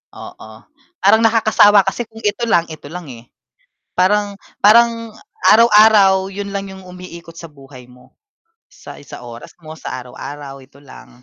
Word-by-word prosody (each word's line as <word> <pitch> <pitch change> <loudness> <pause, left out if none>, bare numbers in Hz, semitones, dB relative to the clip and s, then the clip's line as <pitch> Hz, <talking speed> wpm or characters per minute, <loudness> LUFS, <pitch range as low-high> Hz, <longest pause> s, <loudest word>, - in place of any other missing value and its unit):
Oo, 110 - -12 0.5
parang 220 - +5
nakakasawa 220 -3 +4
kasi 240 +4 -4
kung 225 0 -15
ito 210 +3 -2
lang, 170 -7 +2
ito 150 -2 -11
lang 165 -3 -9
eh. 120 +1 -14 0.6
Parang 200 +2 0 0.2
parang 230 +1 +3 0.4
araw-araw 210 -4 +4
yun 200 0 -7
lang 195 -1 -5
yung 190 -1 -13
umiikot 175 -2 -12
sa 165 -2 -11
buhay 135 -3 -15
mo, 125 0 -22 0.5
sa - - -14
isang 145 - -12
oras 120 -1 -12
mo, 155 0 -11
sa - - -7
araw-araw 140 +2 -10
ito 135 +1 -20
lang. 130 -2 -16
185 Hz, 150 wpm, -17 LUFS, 145-210 Hz, 0.6 s, parang